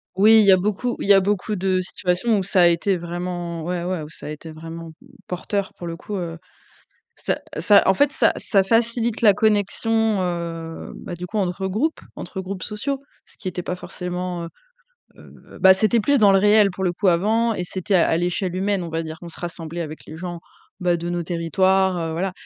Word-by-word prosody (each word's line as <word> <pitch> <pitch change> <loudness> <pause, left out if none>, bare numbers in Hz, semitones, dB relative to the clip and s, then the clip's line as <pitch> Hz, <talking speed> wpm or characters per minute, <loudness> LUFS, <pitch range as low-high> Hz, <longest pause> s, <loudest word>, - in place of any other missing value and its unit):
Oui, 220 +3 +7
il - - +3
y 195 - +7
a 185 - +7
beaucoup 210 +6 -1
il - - -3
y 200 - +8
a 195 - +7
beaucoup 205 +2 -1
de 185 0 +1
situations 185 +5 0
où 195 - 0
ça 185 -1 +2
a 175 - +7
été 175 +3 +2
vraiment 175 -1 -5
ouais, 175 +1 -3
ouais, 180 -1 -2
où 150 - -9
ça 165 - -10
a - - -5
été 155 +1 -8
vraiment, 165 +1 -8
mmh, - - -18 0.2
porteur 195 +2 -3
pour 175 - -8
le 165 0 -5
coup. 205 - -6
Heu, 170 -2 -5 0.8
ça - - -2 0.2
ça 205 -3 +6
en 190 - +6
fait, 285 +7 +3
ça - - +3
ça 195 -3 +2
facilite 230 +2 +1
la 210 -3 +7
connexion, 220 +1 +1
heu, 170 -2 -4
bah, 175 - -7
du 175 +1 -6
coup, 215 +4 -5
entre 190 0 -1
groupes 255 +12 -1 0.2
entre 190 - -6
groupes 185 0 -6
sociaux. 265 +6 -3 0.3
Ce - - -21
qui - - -7
était 180 0 -4
pas 180 - -4
forcément 180 -1 -5
heu 165 - -6 0.7
heu, - - -16
bah, 190 -1 +7
c'était 220 +4 +2
plus 285 +5 +3
dans 205 -2 +6
le 195 - +5
réel, 205 0 +5
pour 190 +1 -4
le 175 - +1
coup, 195 +2 0
avant 220 +6 +2
et 180 - -3
c'était 185 +3 -3
à 170 - +4
à 160 - +2
l'échelle 180 +1 -1
humaine, 195 -1 0
on - - -5
va 165 0 -2
dire. 160 0 -7
On 170 - -7
se - - -10
rassemblait 170 -1 -6
avec 155 -1 -6
les 155 - -9
gens, 175 -1 -5 0.4
bah, 175 -1 +2
de 170 - -5
nos 175 0 -2
territoires, 185 +2 +1
heu, 165 -1 -3
voilà. 185 +3 -2
185 Hz, 225 wpm, -22 LUFS, 170-205 Hz, 0.8 s, y